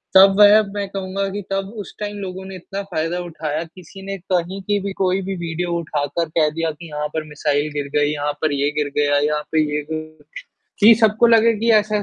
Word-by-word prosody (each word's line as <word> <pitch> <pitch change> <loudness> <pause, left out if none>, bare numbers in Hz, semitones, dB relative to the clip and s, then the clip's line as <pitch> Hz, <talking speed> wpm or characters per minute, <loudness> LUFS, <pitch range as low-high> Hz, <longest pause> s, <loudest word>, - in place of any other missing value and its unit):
तब 195 +1 +8
वह 210 +1 +8
मैं 205 -1 -3
कहूँगा 195 0 -3
कि 205 +1 -4
तब 195 0 -1
उस 195 - -11
टाइम 205 0 -4
लोगों 190 -1 -6
ने 190 0 -8
इतना 195 +2 -6
फ़ायदा 165 +2 -1
उठाया 160 -2 -4
किसी 180 +3 -13
ने 195 0 -4 0.2
कहीं 185 +2 0
की 205 +2 0
भी 200 - -3
कोई 190 +1 +2
भी 195 +1 -4
वीडियो 170 +1 -3
उठाकर 155 0 -2
कह 155 -2 +4
दिया 165 -1 -1
कि 165 +3 -11
यहाँ 150 0 -3
पर 160 - -2
मिसाइल 145 0 -1
गिर 145 -1 -3
गई, 145 0 +3
यहाँ 145 0 -1
पर 155 - +1
ये 140 +1 +1
गिर 150 -1 +1
गया, 145 -1 +3
यहाँ 150 +1 0
पे 160 - +2
ये 150 - 0
गि 155 -1 -6 0.6
कि 220 +2 +9
सबको 220 +1 +4
लगे 230 0 +5
कि 230 +2 +1
ऐसा 210 -1 +2
175 Hz, 220 wpm, -20 LUFS, 150-195 Hz, 0.6 s, कि